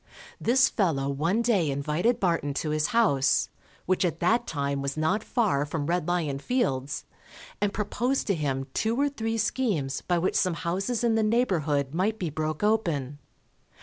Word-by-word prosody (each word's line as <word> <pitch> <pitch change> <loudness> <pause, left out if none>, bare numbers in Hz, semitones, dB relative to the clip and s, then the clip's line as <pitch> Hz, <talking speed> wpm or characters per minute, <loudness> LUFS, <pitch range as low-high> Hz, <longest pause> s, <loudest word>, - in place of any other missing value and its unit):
This 255 +3 +4
fellow 160 - 0
one 165 +11 0
day 200 -10 +2
invited 150 - 0
Barton 165 -7 0
to 150 +2 -1
his 150 -1 +1
house, 140 - +2 0.4
which 185 +1 +1
at 170 -2 -1
that 230 +7 +2
time 140 -2 -2
was 140 +2 -3
not 185 +8 +1
far 210 - +1
from 145 0 -3
Red 175 0 -1
Lion 160 -6 -1
Fields, 140 - -1 0.6
and 205 -1 +2
proposed 235 +6 -1
to 200 - +1
him 135 -5 -2
two 225 +4 0
or 285 0 +3
three 225 -4 -3
schemes 205 - -1
by 175 - 0
which 175 +2 0
some 180 -3 +1
houses 195 +8 -2
in 235 -1 +3
the 220 - +2
neighbourhood 165 - +1
might 200 +6 0
be 175 -6 -3
broke 155 +3 -3
open. 160 -11 0
175 Hz, 170 wpm, -27 LUFS, 145-220 Hz, 0.6 s, This